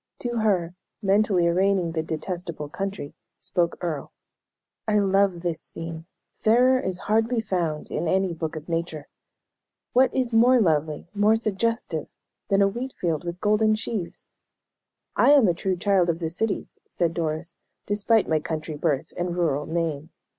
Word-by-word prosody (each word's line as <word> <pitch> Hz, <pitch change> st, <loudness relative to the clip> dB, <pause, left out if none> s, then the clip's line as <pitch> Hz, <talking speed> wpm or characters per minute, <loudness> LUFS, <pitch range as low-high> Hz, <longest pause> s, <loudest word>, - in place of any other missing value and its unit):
To 240 Hz, -1 st, -2 dB
her, 185 Hz, -6 st, +1 dB, 0.3 s
mentally 195 Hz, -2 st, +3 dB
arraigning 185 Hz, 0 st, +2 dB
"the 160 Hz, -1 st, -1 dB
detestable 160 Hz, -1 st, -5 dB
country," 195 Hz, -3 st, -5 dB, 0.3 s
spoke 170 Hz, -1 st, 0 dB
Earle: 160 Hz, -6 st, -3 dB, 0.8 s
"I 210 Hz, -1 st, +3 dB
love 195 Hz, -3 st, +2 dB
this 170 Hz, -2 st, -2 dB
scene; 165 Hz, 0 st, -8 dB, 0.3 s
fairer 250 Hz, +4 st, +4 dB
is 185 Hz, -5 st, -3 dB
hardly 225 Hz, +3 st, +2 dB
found 175 Hz, -8 st, -2 dB
in 165 Hz, -, -1 dB
any 190 Hz, +1 st, +1 dB
book 160 Hz, -1 st, -4 dB
of 155 Hz, 0 st, -7 dB
nature. 165 Hz, -3 st, -3 dB, 0.8 s
What 255 Hz, 0 st, +5 dB
is 250 Hz, -3 st, -1 dB
more 245 Hz, +3 st, +6 dB
lovely, 155 Hz, -5 st, +1 dB
more 210 Hz, +2 st, +4 dB
suggestive, 220 Hz, -6 st, -1 dB, 0.4 s
than 200 Hz, 0 st, +4 dB
a -, -, +5 dB
wheat 245 Hz, +6 st, -4 dB
field 165 Hz, -3 st, -1 dB
with 175 Hz, +1 st, -6 dB
golden 215 Hz, +1 st, +3 dB
sheaves?" 215 Hz, -4 st, -5 dB, 0.8 s
"I 285 Hz, -, +6 dB
am 275 Hz, -7 st, +6 dB
a 175 Hz, -, +3 dB
true 185 Hz, +2 st, -2 dB
child 185 Hz, -1 st, +2 dB
of 165 Hz, -, +1 dB
the 165 Hz, -2 st, -3 dB
cities," 200 Hz, +3 st, -3 dB
said 170 Hz, -2 st, 0 dB
Doris, 160 Hz, 0 st, -3 dB, 0.3 s
"despite 210 Hz, +2 st, +2 dB
my 160 Hz, -1 st, +2 dB
country 155 Hz, 0 st, -4 dB
birth 145 Hz, -3 st, -1 dB
and 175 Hz, 0 st, -2 dB
rural 150 Hz, -4 st, 0 dB
name. 160 Hz, -2 st, -2 dB
180 Hz, 155 wpm, -25 LUFS, 165-210 Hz, 0.8 s, more